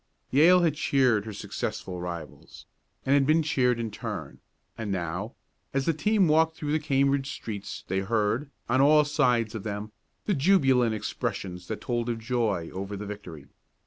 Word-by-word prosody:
Yale 170 Hz, +7 st, +6 dB
had 165 Hz, -4 st, +3 dB
cheered 130 Hz, -8 st, +2 dB
her 110 Hz, -, -5 dB
successful 90 Hz, -2 st, -5 dB
rivals, 85 Hz, -3 st, -8 dB, 0.4 s
and 135 Hz, -, +3 dB
had 140 Hz, -1 st, +4 dB
been 160 Hz, +1 st, +4 dB
cheered 125 Hz, -5 st, +1 dB
in 115 Hz, -2 st, -3 dB
turn, 105 Hz, -, -6 dB, 0.4 s
and 110 Hz, -3 st, -4 dB
now, 95 Hz, +5 st, -3 dB, 0.4 s
as 135 Hz, -1 st, +1 dB
the 165 Hz, -, +2 dB
team 195 Hz, +5 st, +2 dB
walked 160 Hz, +1 st, +3 dB
through 150 Hz, -2 st, -4 dB
the 155 Hz, -, +2 dB
Cambridge 140 Hz, -1 st, +1 dB
streets 105 Hz, -3 st, -6 dB
they 95 Hz, +1 st, 0 dB
heard, 110 Hz, +6 st, 0 dB, 0.2 s
on 130 Hz, +3 st, +3 dB
all 150 Hz, +1 st, +6 dB
sides 125 Hz, -7 st, +1 dB
of 110 Hz, -, -4 dB
them, 105 Hz, +1 st, -5 dB, 0.3 s
the 205 Hz, -, +1 dB
jubilant 135 Hz, -, +3 dB
expressions 90 Hz, -3 st, -4 dB
that -, -, -5 dB
told 120 Hz, -1 st, -2 dB
of 115 Hz, -, -1 dB
joy 115 Hz, -7 st, -1 dB
over 100 Hz, +2 st, -5 dB
the 105 Hz, -, -6 dB
victory. 100 Hz, -8 st, -8 dB
120 Hz, 170 wpm, -27 LUFS, 105-145 Hz, 0.4 s, Yale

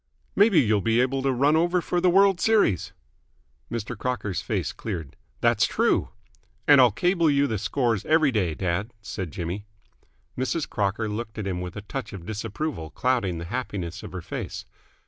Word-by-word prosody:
"Maybe 205 Hz, -4 st, +5 dB
you'll 110 Hz, -6 st, +3 dB
be 115 Hz, +3 st, +2 dB
able 130 Hz, +2 st, +1 dB
to 135 Hz, 0 st, +1 dB
run 140 Hz, +4 st, +3 dB
over 175 Hz, +3 st, +3 dB
for 175 Hz, 0 st, -1 dB
the 180 Hz, -, +4 dB
World's 195 Hz, 0 st, +4 dB
Series?" 210 Hz, -, +3 dB, 0.8 s
Mr. 115 Hz, +1 st, -4 dB
Crocker's 105 Hz, -5 st, -2 dB
face -, -, -2 dB
cleared. 85 Hz, -10 st, -6 dB, 0.3 s
"That's -, -, +3 dB
true." -, -, +1 dB, 0.6 s
"And 145 Hz, -2 st, +8 dB
I'll 125 Hz, -, +7 dB
cable 170 Hz, -, +2 dB
you 140 Hz, -1 st, +3 dB
the 110 Hz, -7 st, -2 dB
scores 115 Hz, +1 st, 0 dB
every 155 Hz, -2 st, +4 dB
day, 90 Hz, -9 st, 0 dB
dad," 95 Hz, +6 st, -2 dB
said 95 Hz, -5 st, -5 dB
Jimmy. 95 Hz, +4 st, -5 dB, 0.7 s
Mrs. 130 Hz, +4 st, -1 dB
Crocker 105 Hz, +2 st, -1 dB
looked 110 Hz, +1 st, -5 dB
at 105 Hz, -, -3 dB
him 90 Hz, -2 st, -2 dB
with 90 Hz, -1 st, -6 dB
a 100 Hz, -, -5 dB
touch 125 Hz, +4 st, -6 dB
of 90 Hz, -4 st, -8 dB
disapproval 110 Hz, -, -4 dB
clouding 115 Hz, -5 st, 0 dB
the 85 Hz, -, -6 dB
happiness 90 Hz, -8 st, -4 dB
of -, -, -9 dB
her 90 Hz, -2 st, -5 dB
face. -, -, -6 dB
115 Hz, 175 wpm, -25 LUFS, 95-140 Hz, 0.8 s, And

